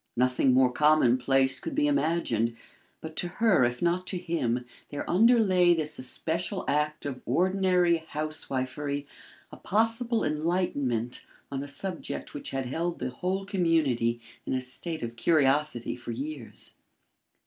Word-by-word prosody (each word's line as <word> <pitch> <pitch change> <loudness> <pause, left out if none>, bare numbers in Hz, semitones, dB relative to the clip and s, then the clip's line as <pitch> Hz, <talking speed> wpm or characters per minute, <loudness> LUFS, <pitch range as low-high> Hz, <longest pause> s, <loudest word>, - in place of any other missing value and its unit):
Nothing 125 +1 +3
more 130 -1 +5
commonplace 135 -2 +3
could 320 -3 -5
be 300 0 +2
imagined, 160 - +1 0.5
but 160 0 -8
to 175 - 0
her, 185 - +3
if 120 +3 0
not 175 +2 +1
to 185 - -2
him, 130 -9 -1 0.2
there 145 - -5
underlay 185 -4 +5
this 155 -2 -2
especial 170 +8 -2
act 150 +1 0
of 135 -3 -4
ordinary 180 +3 +2
housewifery 145 -2 -3 0.5
a - - -10
possible 225 +2 0
enlightenment 150 -7 -1 0.3
on 135 -1 -3
a 145 - -6
subject 170 +5 -4
which 145 - -6
had 135 -1 -3
held 165 +7 -2
the 130 - -3
whole 185 +7 -2
community 155 - +1 0.2
in - - -3
a 130 - 0
state 155 +5 -3
of 115 0 -5
curiosity 140 -2 +2
for 120 -1 -10
years. 135 +1 -6
150 Hz, 135 wpm, -28 LUFS, 130-180 Hz, 0.5 s, more